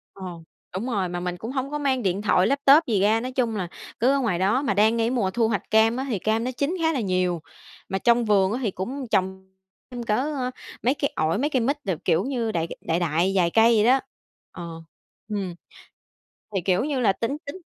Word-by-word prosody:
Ờ, 195 - -9 0.5
đúng 195 +6 -3
rồi, 200 -7 -1
mà 175 0 -4
mình 180 0 -3
cũng 225 +7 -6
hổng 265 0 -2
có 295 - -2
mang 270 -3 0
điện 195 0 0
thoại, 185 -3 +3
laptop 280 +3 +5
gì 215 -5 +1
ra, 215 +3 +3
nói 255 +2 -5
chung 240 -4 0
là 185 -4 -3 0.3
cứ 245 +4 +4
ở 280 - +2
ngoài 215 -9 0
đó. 205 +9 +2
Mà 270 - 0
đang 215 +3 +4
ngay 230 0 +1
mùa 235 -7 0
thu 225 +2 +1
hoạch 205 -5 -3
cam 220 +2 +4
á 260 - -2
thì 225 -6 -1
cam 220 +5 0
nó 255 - -1
chín 285 +8 -1
khá 320 0 +3
là 275 - -1
nhiều, 185 -4 0 0.5
mà 190 - -1
trong 235 +2 +3
vườn 200 -2 +3
á 240 - -1
thì 220 - 0
cũng 250 +9 -5
trồng 190 0 -1 0.4
thêm 245 -1 -6
cỡ, 220 -2 0
ơ, 265 -1 -2 0.3
mấy 255 +3 +2
cây 280 -1 -2
ổi, 160 +5 +1
mấy 290 +5 0
cây 260 - +1
mít 270 +6 +1
đồ, 190 - 0
kiểu 160 - +2
như, 240 -4 -2
đại, 165 -3 -1
ờ, - - -6
đại 165 +2 -1
đại 170 +3 +1
vài 175 -2 +3
cây 225 +4 +5
vậy 210 - +3
đó. 260 +3 +5 0.5
Ờ, 170 -2 -8 0.5
ừm. 195 -4 -3 1.0
Thì 190 - +1
kiểu 185 +4 +2
như 285 -3 -1
là 215 -5 +4
tính 230 +8 -3
tính 330 +7 -7
225 Hz, 240 wpm, -24 LUFS, 190-255 Hz, 1.0 s, laptop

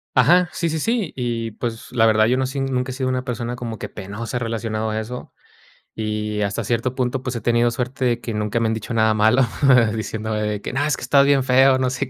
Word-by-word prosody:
Ajá, 175 +8 +5
sí, 170 -1 -1
sí, 160 - -2
sí. 220 +1 -1
Y, 115 -3 -2
pues, 115 +1 -6
la 115 -3 +3
verdad, 110 0 +4
yo 125 +2 +2
no 130 - +1
sé, 135 +2 -4
ni 135 0 -1
nunca 125 0 -1
he - - -5
sido 130 0 -2
una 130 0 -1
persona 120 -1 -3
como 115 -3 -6
que - - -6
penosa 105 +5 -6
relacionado 110 -2 -2
a 110 - -1
eso. 125 +3 -7 0.6
Y 105 -1 -3
hasta 100 +3 -2
cierto 120 +3 -1
punto, 125 0 -1
pues, 125 -2 -3
he - - -3
tenido 120 +1 +2
suerte 125 +2 -3
de 120 -1 +1
que 115 -1 -5
nunca 105 +2 -1
me 115 - +1
han 110 - 0
dicho 110 +2 -5
nada 110 -1 +3
malo 110 +5 +4 0.5
diciéndome 105 -1 -3
que, - - -6
no, 140 +2 0
es 150 -3 +1
que - - -10
estás 140 -1 +4
bien 140 -2 +3
feo, 130 +1 +5
no 130 -1 +1
sé 130 +1 -3
120 Hz, 245 wpm, -21 LUFS, 110-130 Hz, 0.6 s, Ajá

